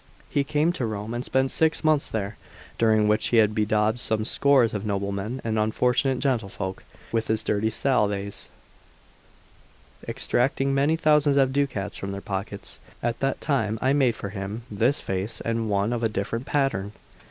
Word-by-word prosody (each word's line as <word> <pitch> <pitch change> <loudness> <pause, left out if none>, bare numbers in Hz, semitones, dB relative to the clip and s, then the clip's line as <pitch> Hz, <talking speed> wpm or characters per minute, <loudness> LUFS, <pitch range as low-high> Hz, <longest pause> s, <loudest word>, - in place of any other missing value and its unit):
He 140 - +2
came 150 +5 +1
to 130 - -2
Rome 105 +1 -4
and 120 +1 -3
spent 130 0 +1
six 160 +1 +1
months 155 -2 +3
there, 105 -1 -3 0.4
during 110 -2 +4
which 105 0 +2
he 120 - +2
bedaubed 105 +1 +1
some 110 -2 0
scores 135 -2 +3
of 105 -2 -3
nobleman 100 +4 -3
and 110 -1 0
unfortunate 125 +4 +1
gentlefolk 110 -8 -2 0.3
with 115 -1 0
his 110 0 0
dirty 105 +1 +1
salves, 105 -5 -1 1.6
extracting 135 +2 0
many 140 +4 +3
thousands 150 -3 +3
of 135 -1 +3
ducats 125 -8 -1
from 100 0 -5
their 100 - -4
pockets. 100 +1 -6 0.2
At 120 0 -1
that 135 0 -1
time 115 -7 0
I 130 +3 +2
made 130 -5 +3
for 100 - -6
him 100 +3 -5
this 115 +7 +2
vase 95 +3 -3
and 115 -1 -2
one 100 +3 +1
of 120 - -2
a 115 - +1
different 115 +5 -3
pattern. 120 -9 0
115 Hz, 165 wpm, -25 LUFS, 105-135 Hz, 1.6 s, during